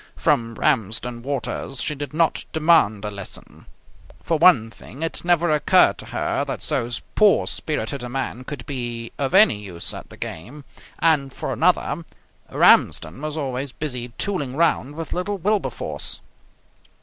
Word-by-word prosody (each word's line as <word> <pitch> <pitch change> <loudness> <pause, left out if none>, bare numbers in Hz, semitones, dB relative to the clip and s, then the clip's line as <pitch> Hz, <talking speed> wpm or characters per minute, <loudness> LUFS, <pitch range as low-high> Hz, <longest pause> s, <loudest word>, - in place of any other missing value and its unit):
From 115 -1 0
Ramsden 120 +1 +1
Waters 135 0 -3
she 150 - 0
did 145 0 -6
not 160 +1 +1
demand 155 -11 +3
a 105 - -3
lesson. 100 -1 -10 0.6
For 165 -2 0
one 135 -11 +5
thing 135 +6 -10
it 165 - -3
never 175 -1 +2
occurred 150 -1 +4
to - - -9
her - - -1
that - - -5
so 120 - +2 0.2
poor 210 -2 +4
spirited 145 -3 -1
a 125 - -6
man 130 -1 -4
could 130 -2 -7
be 120 -4 -5
of 140 +4 -1
any 195 - +6
use 95 -5 -2
at - - -9
the - - -13
game, 125 - -7 0.3
and 150 -5 +2
for - - -4
another - - +1 0.5
Ramsden 80 - +3
was 155 0 -4
always 135 -2 -3
busy 125 -5 -4
tooling 145 -10 -2
round 150 -3 +1
with 165 0 -5
little 200 +3 -2
Wilberforce. 205 +3 -2
140 Hz, 150 wpm, -22 LUFS, 120-160 Hz, 0.6 s, any